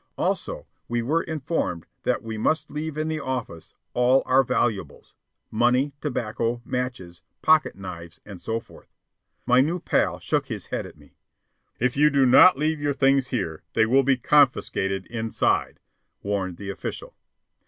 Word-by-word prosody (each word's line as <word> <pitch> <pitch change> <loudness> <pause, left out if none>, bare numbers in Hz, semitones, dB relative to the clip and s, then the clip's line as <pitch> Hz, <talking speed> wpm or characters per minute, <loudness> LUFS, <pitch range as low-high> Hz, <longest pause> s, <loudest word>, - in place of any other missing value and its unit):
Also, - - -2 0.2
we 120 0 -1
were 155 +7 +1
informed 150 - -3 0.2
that - - 0
we 110 -1 -5
must 155 +7 0
leave 150 0 -4
in 155 0 -1
the 160 -1 -2
office 125 - -5 0.2
all 125 +2 +3
our 130 +1 +4
valuables: 120 -4 -2 0.4
money, 125 +5 +2
tobacco, 120 -3 -2
matches, 125 -10 -4 0.2
pocketknives, 95 - 0
and 95 -4 -10
so 115 0 -2
forth. - - -17 0.6
My 125 +1 +5
new 165 +6 0
pal - - +1
shook - - -1
his - - -5
head - - -4
at - - -15
me. - - -20 0.7
"If 125 +1 +1
you 150 +2 +5
do 140 -2 +3
not 155 +8 +7
leave 155 +1 -1
your 145 -1 0
things 135 -1 +3
here, 80 -11 -3
they 110 - +4
will 130 +4 +4
be 135 0 +2
confiscated 120 -9 +2
inside," 115 -1 -1 0.4
warned 95 -3 -2
the 100 -1 -5
official. 100 - -7
125 Hz, 155 wpm, -24 LUFS, 110-145 Hz, 0.7 s, not